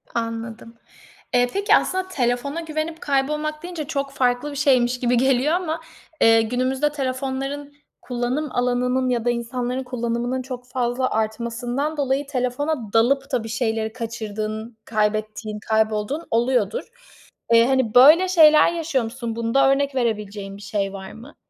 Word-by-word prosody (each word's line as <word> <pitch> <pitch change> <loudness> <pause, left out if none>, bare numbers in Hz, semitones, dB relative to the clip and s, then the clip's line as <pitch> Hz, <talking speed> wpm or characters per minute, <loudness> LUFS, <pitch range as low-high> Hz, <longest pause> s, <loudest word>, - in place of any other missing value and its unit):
Anladım. 230 0 -4 0.6
Eee, 245 0 +4
peki, 400 +2 +4
aslında 375 0 0
telefona 280 0 -1
güvenip 315 0 -4
kaybolmak 300 +3 -1
deyince 345 -4 -5
çok 275 -1 -2
farklı 255 +2 0
bir - - -8
şeymiş 255 -4 +2
gibi 245 0 +2
geliyor. 265 +4 +2
Ama, 330 -2 -2 0.4
eee, 225 0 +6
günümüzde 255 +5 0
telefonların 270 +1 -3 0.3
kullanım 250 +4 -2
alanının 250 +1 0
ya 240 -2 -1
da - - +3
insanların 245 +2 -2
kullanımının 245 0 -2
çok 250 -1 -8
fazla 250 0 -1
artmasından 240 +7 -2
dolayı 275 0 0
telefona 255 -2 -2
dalıp 245 +5 +2
da 235 - 0
bir 225 - -7
şeyleri 220 -2 -1
kaçırdığın 220 -1 -5
kaybettiğin 215 0 -2
kaybolduğun 220 +7 0
oluyodur. 250 - +1 0.7
Eee, 230 +1 +6
hani, 260 -4 +1
böyle 305 +9 +8
şeyler 315 -4 +6
yaşıyor 320 -6 -1
musun? 230 0 -5
Bunda 235 +4 +2
örnek 280 0 0
verebileceğin 210 -5 -2
bir - - -13
şey 200 -1 -2
var 190 -1 -8
mı? 240 +6 -13
250 Hz, 140 wpm, -22 LUFS, 230-280 Hz, 0.7 s, böyle